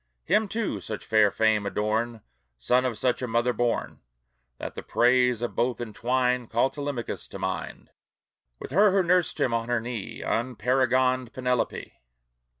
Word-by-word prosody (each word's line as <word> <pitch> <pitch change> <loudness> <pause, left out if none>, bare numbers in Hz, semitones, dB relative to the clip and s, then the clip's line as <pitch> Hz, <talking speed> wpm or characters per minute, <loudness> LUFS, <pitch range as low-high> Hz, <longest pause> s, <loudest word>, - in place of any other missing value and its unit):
Him, 210 +5 +2
too, 220 +2 -2
such 110 - -6
fair 110 -2 +4
fame 110 0 +2
adorn, 110 +2 -1 0.3
Son 125 - +2
of 120 -4 -1
such 125 0 0
a 125 - -2
mother 120 +2 +1
born, 120 -1 -2 0.6
That - - -6
the - - -6
praise 125 -1 +2
of 120 - -2
both 120 0 0
entwined 125 +2 -1
Call 120 +3 +2
Telemachus 140 -4 -4
to - - -8
mind, 95 -1 -5 0.7
With - - -9
her 205 +7 +5
who 195 0 +3
nursed 180 -2 +2
him 120 - +1
on 115 0 -1
her 120 -1 +2
knee, 115 -2 -6
Unparagoned 130 +1 +1
Penelope! 125 -2 -2
125 Hz, 150 wpm, -26 LUFS, 115-130 Hz, 0.7 s, her